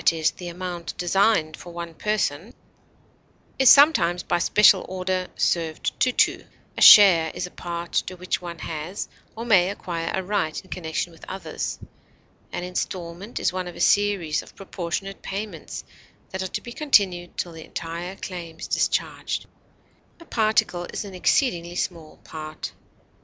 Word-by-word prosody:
e._, 160 -2 +2
the 180 - -7
amount 175 -1 -6
designed 180 -3 +2
for 175 - -11
one 170 -1 -6
person) 205 0 -2 1.0
is 265 -2 +7
sometimes, 230 - +6
by 175 - 0
special 205 +2 +5
order, 185 0 -2
served 165 -2 0
to 255 - +3
two; - - +2 0.3
a - - -5
share 175 -6 +9
is 180 - -2
a 180 - -10
part 170 -1 -6
to 185 - -1
which 180 0 -2
one 170 -1 -7
has 165 +4 -5 0.3
or 230 +1 -5
may 190 -6 +5
acquire 170 -4 -4
a 190 - -2
right 185 -5 -1
in 185 - -21
connection 170 0 -3
with 165 - -18
others; 190 +1 -4 0.7
an 175 - -4
instalment 180 +3 -4
is - - +1
one 185 -1 -3
of 175 - -8
a - - -10
series 200 -6 +2
of - - -16
proportionate 195 0 -5
payments 195 -5 -6 0.5
that 190 - -4
are 190 - -2
to - - -4
be 240 - -9
continued 195 - +2
till 175 - -2
the 165 -1 -10
entire 170 +4 -6
claim 170 -4 -7
is - - -5
discharged; - - -1 0.7
a 335 - -14
particle 215 - +1
is - - -4
an 195 - -9
exceedingly 175 - +1
small 165 -4 -4
part. 155 -1 -7
180 Hz, 160 wpm, -24 LUFS, 170-195 Hz, 1.0 s, share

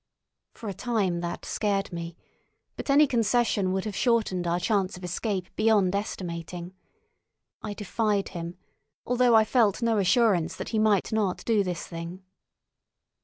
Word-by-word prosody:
For 225 - -8
a 200 - -3
time 200 -5 -1
that 170 0 -5
scared 200 -3 -1
me; 170 0 -6 0.6
but - - -7
any 290 +2 +6
concession 230 -5 +1
would 190 +1 -1
have 210 -3 -4
shortened 215 -8 +1
our 170 +1 +1
chance 190 -1 0
of 180 - -12
escape 185 +1 -3
beyond 205 -4 +3
estimating. 175 -3 -5 0.9
I 210 -1 -5
defied 210 -1 -1
him, 170 0 -6 0.5
although 245 -1 +3
I 220 - +7
felt 225 -1 +2
no 225 -2 +2
assurance 195 -3 +3
that - - -6
he 220 - 0
might 215 -2 +2
not 205 -4 0
do 220 -3 +3
this 180 -3 -4
thing. 170 +2 -7
200 Hz, 150 wpm, -27 LUFS, 180-225 Hz, 0.9 s, I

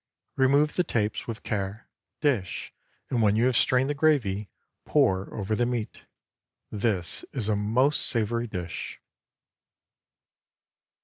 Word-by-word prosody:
Remove 140 +3 +3
the 180 - +4
tapes 110 -9 -1
with 115 -2 -6
care; 100 +1 -3 0.3
dish, 125 - -1 0.4
and 120 - +1
when 105 -1 +4
you 115 +3 +3
have 130 -1 +2
strained 130 +2 +3
the 145 - 0
gravy, 125 -10 +1 0.3
pour 95 +1 +2
over 105 0 -3
the 120 - +1
meat. 120 -3 -4 0.7
This 100 -5 -1
is 120 -6 -3
a 110 - +2
most 120 +8 +2
savory 115 +1 +1
dish. 90 -5 -6
110 Hz, 125 wpm, -27 LUFS, 100-130 Hz, 0.7 s, the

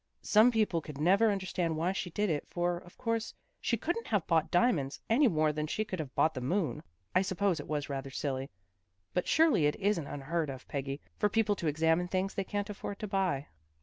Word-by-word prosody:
Some 215 +3 +6
people 215 -8 +1
could 150 -2 -9
never 195 +9 +4
understand 185 -5 -1
why 170 +3 +1
she 190 -1 -3
did 205 +2 0
it, 150 - -2
for, 175 0 0
of 175 0 -17
course, 230 -2 -2 0.2
she 235 - 0
couldn't 345 - -2
have 205 -6 +1
bought 160 -1 +2
diamonds 150 - +2
any 265 +5 +5
more 155 -6 +2
than 150 0 -2
she 215 +7 -1
could 185 -4 -5
have 140 -5 -5
bought 160 - +3
the 130 - -5
moon. 160 - -1 0.3
I 185 - +5
suppose 190 -2 0
it 145 - -7
was 150 -1 -2
rather 135 -1 -4
silly, 135 -1 -3 0.6
but 180 - 0
surely 310 - +4
it 150 - 0
isn't 195 -7 0
unheard 150 +2 -2
of, 130 -1 -8
Peggy, 140 0 -4 0.2
for 210 - +3
people 215 -1 +2
to 170 - -3
examine 160 +3 +2
things 190 +2 -1
they 195 - -1
can't 205 +2 -3
afford 200 0 -6
to 215 - -5
buy. 190 -8 0
175 Hz, 215 wpm, -31 LUFS, 150-205 Hz, 0.6 s, Some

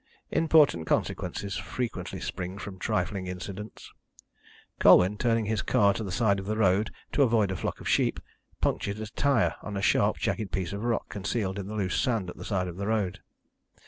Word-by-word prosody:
Important 150 - +4
consequences 100 0 -1
frequently 125 -2 -4
spring 95 +1 -5
from 100 -2 -8
trifling 105 -3 -1
incidents. 95 +3 -7 0.9
Colwyn, 95 +3 +6
turning 115 0 +1
his 110 0 0
car 100 -1 +3
to 110 - -4
the 95 - -5
side 100 -1 +2
of 95 - -7
the 110 +1 -1
road 105 0 +3 0.2
to - - +1
avoid 110 -6 +3
a - - -2
flock - - -3
of - - -7
sheep, - - +2 0.4
punctured 100 +1 -1
a 110 - -4
tyre 125 +2 +1
on 105 -2 -5
a - - -2
sharp - - +3
jagged 105 -4 -2
piece 95 -1 -2
of 100 +2 -4
rock 120 -1 -1
concealed 100 -1 -2
in 95 - -5
the 105 - -5
loose 95 -3 0
sand 110 -8 0
at - - -14
the - - -8
side 95 -3 -1
of 90 0 -7
the 100 +1 -3
road. 105 -5 0
100 Hz, 190 wpm, -28 LUFS, 95-110 Hz, 0.9 s, Colwyn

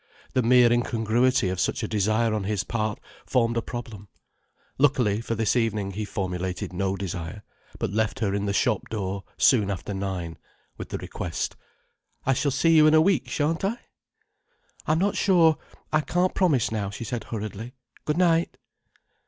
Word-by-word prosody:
The 130 - +3
mere 120 0 +5
incongruity 120 -1 +1
of 90 -1 -3
such - - 0
a - - -1
desire 110 +2 +1
on 105 -3 -2
his 100 -2 -1
part 110 0 -2 0.2
formed 120 -2 +1
a 115 - +1
problem. 115 -4 -7 0.7
Luckily, 125 -7 +3
for 115 0 -3
this 110 +1 +1
evening 110 -4 0
he 105 +2 -4
formulated 90 -2 -3
no 95 +1 -1
desire, 95 +1 -5 0.3
but - - -2
left 110 -1 0
her 100 -4 -1
in 100 0 -1
the - - +1
shop 110 +1 0
door 100 -2 -3
soon 105 -7 +4
after 100 +1 -4
nine, 95 -4 -4 0.4
with - - -8
the - - -3
request: 90 -2 -4 0.7
"I 135 - +3
shall 140 +3 0
see 165 +5 +3
you 155 -1 +7
in 155 - +5
the 155 - +7
week, 190 +2 +2
shan't 160 +4 -1
I?" 210 +5 0 1.1
"I'm 155 - +3
not 195 +4 +1
sure. 165 -5 +4 0.3
I 155 - +4
can't 180 +4 0
promise 150 - +2
now," 105 -3 -2
she 100 +3 -7
said 115 -1 -4
hurriedly. 110 +2 -6 0.3
"Good 150 +1 -1
night." 170 -2 +2
110 Hz, 170 wpm, -25 LUFS, 100-135 Hz, 1.1 s, you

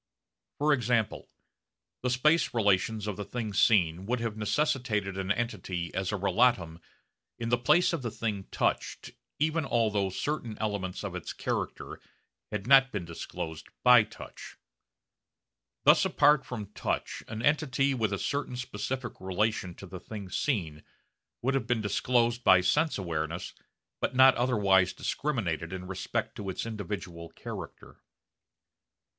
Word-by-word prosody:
For 150 +1 +3
example, 120 -4 0 0.7
the 125 - 0
space 140 +3 +2
relations 105 0 +2
of 105 -3 -3
the 105 - -3
thing 110 0 -4
seen 90 -3 +3
would 125 +1 0
have 115 -2 -3
necessitated 110 -4 0
an 95 0 -2
entity 95 -6 -2
as 95 +1 -1
a - - -1
relatum 95 -4 +2 0.6
in 115 -1 -3
the 120 - +3
place 155 +8 +4
of 165 - -1
the 120 - -2
thing 105 -3 -3
touched - - -1 0.3
even 155 +2 +1
although 110 -6 +1
certain 120 +2 -3
elements 100 -4 -3
of 100 -3 -4
its 90 -3 -5
character - - -4 0.5
had 105 -2 -3
not 135 +1 +6
been 100 -5 -3
disclosed 80 -1 -6 0.2
by 125 -2 +8
touch. 105 - -10 1.3
Thus - - +6
apart 145 -1 +4
from 120 -4 -4
the 100 - -13
touch - - -3
an 110 +1 -5
entity 140 -2 +2
with 110 -5 0
a 100 - -1
certain 140 +3 -2
specific 125 0 -4
relation 95 -1 -1
to - - -10
the 95 0 -8
thing 100 0 -8
seen 85 - -1 0.6
would 135 +3 +1
have 130 -5 -1
been 120 -2 +1
disclosed 120 +3 +1
by 95 -1 +7
sense 150 - +2
awareness 85 -2 -3 0.5
but - - -1
not 130 0 +8
otherwise 100 -7 +3
discriminated 95 - -2
in 95 -1 -5
respect 95 0 -3
to 100 -2 -5
its 95 - -3
individual 95 -6 -6
character. - - -9
110 Hz, 145 wpm, -29 LUFS, 95-125 Hz, 1.3 s, by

